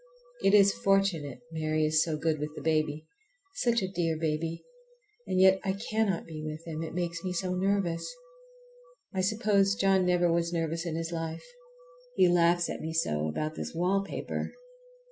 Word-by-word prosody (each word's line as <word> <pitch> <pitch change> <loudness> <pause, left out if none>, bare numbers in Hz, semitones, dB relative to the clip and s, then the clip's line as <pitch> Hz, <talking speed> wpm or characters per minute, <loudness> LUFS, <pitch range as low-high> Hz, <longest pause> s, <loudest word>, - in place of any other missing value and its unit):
It 195 - +5
is 200 -1 +6
fortunate 195 -9 +1
Mary 155 -1 0
is 155 +1 +3
so 160 -2 -2
good 155 -1 0
with 150 +1 -4
the - - -7
baby. 155 -1 0 0.5
Such 235 - +1
a - - 0
dear 170 -4 -1
baby! 160 +1 -2 0.6
And 185 - 0
yet 190 0 +6
I 190 -2 0
cannot 215 -2 -1
be 155 -2 -7
with 155 +1 -6
him, 160 -1 -5
it 165 0 -5
makes 170 -1 -3
me 185 -1 -2
so 180 +1 -1
nervous. 185 - 0 1.0
I 190 - 0
suppose 200 -1 +2
John 195 -2 +3
never 175 -1 +3
was 170 0 0
nervous 165 0 -2
in 160 - -2
his 165 +1 -3
life. 165 -1 -4 0.7
He 185 - +5
laughs 175 0 +3
at - - -5
me 160 +1 -4
so 75 - 0
about 155 - -2
this 155 - -6
wallpaper! 195 +3 -1
170 Hz, 170 wpm, -29 LUFS, 160-190 Hz, 1.0 s, is